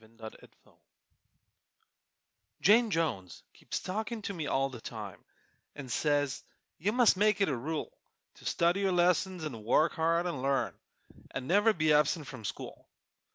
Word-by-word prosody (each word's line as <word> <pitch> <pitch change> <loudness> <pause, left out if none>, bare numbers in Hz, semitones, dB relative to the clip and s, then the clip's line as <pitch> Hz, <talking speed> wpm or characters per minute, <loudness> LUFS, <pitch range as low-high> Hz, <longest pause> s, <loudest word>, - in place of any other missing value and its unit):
_ 110 - -18
Jane 110 -1 -11
Jones - - -27 1.8
Jane 225 +4 +5
Jones 145 - -2
keeps - - -5
talkin' 220 +3 -4
to 200 - -3
me 160 -5 -4
all 135 0 +1
the 125 -4 -10
time, 105 -7 -8 0.5
An' 140 -3 -8
says 145 0 0 0.4
you 200 +6 +1
must 240 -4 +4
make 210 +1 +3
it 200 - +2
a 140 - 0
rule 150 +6 -4 0.4
To - - -16
study 170 +3 +2
your 195 -2 +1
lessons 180 0 +1
'nd 130 -6 -7
work 150 +8 +3
hard 165 +2 +1
'nd 170 -7 -3
learn, 135 0 0 0.6
An' 130 - -5
never 205 - +4
be 155 -5 +2
absent 150 +1 +2
from 125 -5 -9
school. - - -7
160 Hz, 155 wpm, -31 LUFS, 135-190 Hz, 1.8 s, Jane